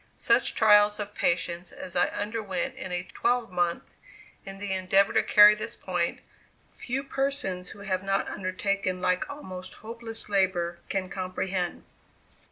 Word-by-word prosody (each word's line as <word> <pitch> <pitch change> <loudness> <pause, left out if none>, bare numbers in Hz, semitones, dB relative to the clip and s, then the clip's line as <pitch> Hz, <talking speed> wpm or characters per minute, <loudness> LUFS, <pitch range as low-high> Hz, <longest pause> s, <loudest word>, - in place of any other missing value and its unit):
Such - - +2
trials 210 -1 +5
of 205 0 -5
patience 175 -1 -1
as 180 - -9
I 175 - +4
underwent 205 +1 -3
in 260 -9 -7
a 180 0 -2
twelvemonth, 185 -5 -1 0.5
in 195 0 -7
the 200 -1 -3
endeavor 190 +1 +3
to - - +4
carry 210 0 +8
this 210 - -5
point, 175 -2 -2 0.5
few 260 +3 -4
persons 270 -10 -2
who 200 - -11
have 190 -2 -1
not 195 0 0
undertaken 185 0 -2
like 180 0 0
almost 185 -11 -8
hopeless 225 0 -6
labor 185 -4 +1
can 190 -2 -1
comprehend. 185 -1 -3
195 Hz, 140 wpm, -27 LUFS, 185-210 Hz, 0.5 s, carry